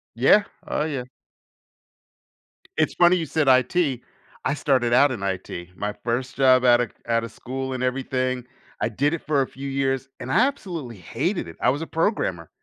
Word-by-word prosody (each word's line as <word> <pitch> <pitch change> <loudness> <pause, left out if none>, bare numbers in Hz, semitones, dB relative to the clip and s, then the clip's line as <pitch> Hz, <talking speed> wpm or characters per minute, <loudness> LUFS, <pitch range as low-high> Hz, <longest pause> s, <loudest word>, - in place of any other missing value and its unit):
Yeah. 135 - +5 0.2
Oh, - - -1
yeah. 140 -5 -3 1.7
It's - - +2
funny 175 +1 +6
you 170 -3 -1
said 155 -1 0
IT. 130 +2 +3 0.4
I 140 - +2
started 130 -5 +1
out 140 +2 +5
in 115 - -4
IT. 90 -2 -5
My 105 0 -2
first 125 +3 -3
job 130 -2 +5
out 120 0 +6
of 120 - -2
c - - -37
out 115 0 +1
of 115 - -6
school 130 +1 -5
and 130 - -3
everything. 130 -1 -1 0.4
I - - +1
did 140 +7 0
it 170 - -3
for 145 -2 +2
a - - -6
few 140 +1 -7
years, 135 -1 -1
and 130 +1 -5
I - - +4
absolutely 170 - -6
hated 90 - -2
it. - - -11
I - - +4
was 145 +4 -3
a - - -7
programmer. 130 - -1
130 Hz, 190 wpm, -24 LUFS, 120-145 Hz, 1.7 s, funny